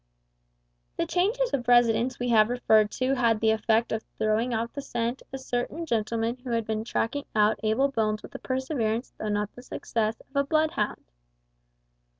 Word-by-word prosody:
The -, -, +1 dB
changes 450 Hz, +8 st, 0 dB
of 250 Hz, -3 st, -1 dB
residence 240 Hz, 0 st, +4 dB
we 245 Hz, 0 st, -2 dB
have 220 Hz, -1 st, +5 dB
referred 220 Hz, -3 st, +3 dB
to 260 Hz, +1 st, 0 dB
had 230 Hz, -4 st, +2 dB
the 220 Hz, 0 st, +3 dB
effect 220 Hz, +1 st, +1 dB
of 220 Hz, -, -1 dB, 0.2 s
throwing 220 Hz, +3 st, +1 dB
off 230 Hz, 0 st, -2 dB
the 285 Hz, -, -4 dB
scent 240 Hz, -1 st, -3 dB
a 270 Hz, -, -4 dB
certain 260 Hz, +5 st, -3 dB
gentleman 230 Hz, -2 st, -1 dB
who 250 Hz, 0 st, -9 dB
had 230 Hz, -2 st, 0 dB
been 220 Hz, 0 st, -2 dB
tracking 240 Hz, +4 st, -2 dB
out 210 Hz, 0 st, +3 dB
Abel 220 Hz, +6 st, +2 dB
Bones 215 Hz, -3 st, 0 dB
with -, -, -10 dB
the -, -, -8 dB
perseverance, 260 Hz, -3 st, -2 dB
though 215 Hz, -, -3 dB
not 205 Hz, 0 st, -1 dB
the 245 Hz, -, -11 dB
success, 225 Hz, -3 st, -2 dB
of 275 Hz, -, -23 dB
a 280 Hz, -, +3 dB
bloodhound. 280 Hz, -, -1 dB
235 Hz, 175 wpm, -27 LUFS, 220-260 Hz, 0.2 s, have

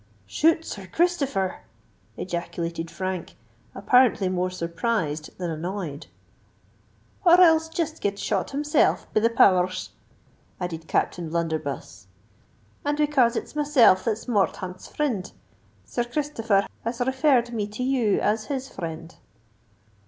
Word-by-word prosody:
"Shoot 320 Hz, -, +2 dB
Sir 195 Hz, -2 st, -7 dB
Christopher!" 280 Hz, -, 0 dB, 0.6 s
ejaculated 170 Hz, -2 st, -4 dB
Frank, 185 Hz, -1 st, -4 dB, 0.4 s
apparently 245 Hz, -7 st, +3 dB
more 185 Hz, 0 st, 0 dB
surprised 170 Hz, -3 st, -2 dB
than 175 Hz, -2 st, -3 dB
annoyed. 165 Hz, -2 st, -5 dB, 1.2 s
"Or 350 Hz, -1 st, +7 dB
else 320 Hz, -2 st, +5 dB
jist 320 Hz, -1 st, -3 dB
get 200 Hz, -1 st, -1 dB
shot 200 Hz, -1 st, -1 dB
himself, 295 Hz, +1 st, +1 dB
be -, -, +4 dB
the 230 Hz, +2 st, +3 dB
power 185 Hz, -6 st, +5 dB
rs!" 185 Hz, 0 st, -6 dB, 0.7 s
added 165 Hz, -3 st, -5 dB
Captain 170 Hz, +1 st, -1 dB
O'Blunderbuss. 155 Hz, -, -3 dB, 0.8 s
"And 290 Hz, +1 st, -1 dB
it's 300 Hz, 0 st, +2 dB
becase 245 Hz, -3 st, +4 dB
it's -, -, -5 dB
myself 285 Hz, -10 st, +4 dB
that's 225 Hz, -2 st, -1 dB
Morthaunt's 190 Hz, -5 st, -1 dB
frind, 240 Hz, -11 st, -2 dB, 0.5 s
Sir 240 Hz, -, -2 dB
Christopher 235 Hz, -7 st, 0 dB, 0.2 s
has 230 Hz, +2 st, -3 dB
referred 260 Hz, -2 st, +2 dB
me 210 Hz, -3 st, -2 dB
to 215 Hz, +4 st, -5 dB
you 250 Hz, -6 st, +2 dB
as 215 Hz, +1 st, 0 dB
his 270 Hz, -2 st, -4 dB
frind." 165 Hz, -2 st, -7 dB
210 Hz, 125 wpm, -25 LUFS, 175-265 Hz, 1.2 s, Or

